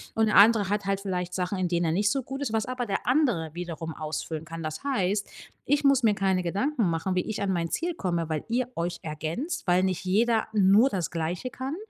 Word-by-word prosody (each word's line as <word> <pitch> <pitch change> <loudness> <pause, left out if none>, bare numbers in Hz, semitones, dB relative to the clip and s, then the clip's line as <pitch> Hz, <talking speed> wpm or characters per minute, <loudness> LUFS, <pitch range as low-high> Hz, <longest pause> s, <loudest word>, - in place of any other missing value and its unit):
und 225 - +3
der 215 - +3
andere 210 -1 +6
hat 205 0 -1
halt 195 0 -1
vielleicht 180 -2 -3
Sachen, 185 +1 -2
in 185 - +1
denen 175 0 0
er 160 - +1
nicht 205 +5 +2
so 270 -1 -1
gut 270 +3 -6
ist, 250 -6 -2
was 220 -1 +1
aber 255 -1 -3
der 195 - -2
andere 245 - +2
wiederum 165 -2 -5
ausfüllen 155 0 -4
kann. 165 0 -7
Das 155 - -5
heißt, 205 -7 0 0.4
ich 290 +2 +2
muss 275 -1 +5
mir 215 -2 +4
keine 190 -2 +1
Gedanken 210 - 0
machen, 165 +3 -1
wie 180 - +2
ich 215 - -3
an 200 -1 0
mein 170 -2 -1
Ziel 345 - -1
komme, 170 - -2
weil 155 -1 -2
ihr 245 +1 0
euch 170 +1 -3
ergänzt, 165 - -4
weil 180 +1 +4
nicht 185 -2 -1
jeder 225 +4 +2
nur 205 +5 +5
das 185 -7 -2
Gleiche 170 +8 -3
kann, 265 +4 -4
195 Hz, 230 wpm, -27 LUFS, 170-235 Hz, 0.4 s, andere